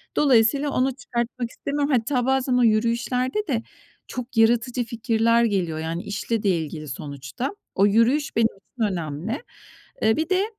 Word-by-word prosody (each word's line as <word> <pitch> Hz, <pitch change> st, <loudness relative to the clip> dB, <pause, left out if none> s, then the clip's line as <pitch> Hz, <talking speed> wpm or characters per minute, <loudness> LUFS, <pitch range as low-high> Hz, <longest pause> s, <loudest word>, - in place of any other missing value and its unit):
Dolayısıyla 275 Hz, +1 st, +4 dB
onu 260 Hz, 0 st, +1 dB
çıkartmak 240 Hz, -1 st, -3 dB
istemiyorum. 285 Hz, +3 st, -2 dB
Hatta 250 Hz, 0 st, +1 dB
bazen 265 Hz, -1 st, +1 dB
o 250 Hz, -, +4 dB
yürüyüşlerde 240 Hz, -, +1 dB
de 230 Hz, -5 st, -1 dB, 0.4 s
çok 250 Hz, -1 st, -7 dB
yaratıcı 240 Hz, +2 st, +3 dB
fikirler 230 Hz, 0 st, +2 dB
geliyor. 180 Hz, -8 st, 0 dB
Yani, 165 Hz, +2 st, -3 dB
işle 215 Hz, +2 st, -2 dB
de 200 Hz, -, +3 dB
ilgili 155 Hz, -3 st, -2 dB
sonuçta. 140 Hz, -, -5 dB, 0.2 s
O 195 Hz, -, +4 dB
yürüyüş 230 Hz, +8 st, +2 dB
benim 230 Hz, 0 st, +4 dB
için 225 Hz, +3 st, -7 dB
önemli. 170 Hz, -, -4 dB, 0.6 s
Eee, 220 Hz, +3 st, +3 dB
bir 320 Hz, +3 st, -1 dB
de 375 Hz, +1 st, +3 dB
230 Hz, 145 wpm, -24 LUFS, 205-255 Hz, 0.6 s, Dolayısıyla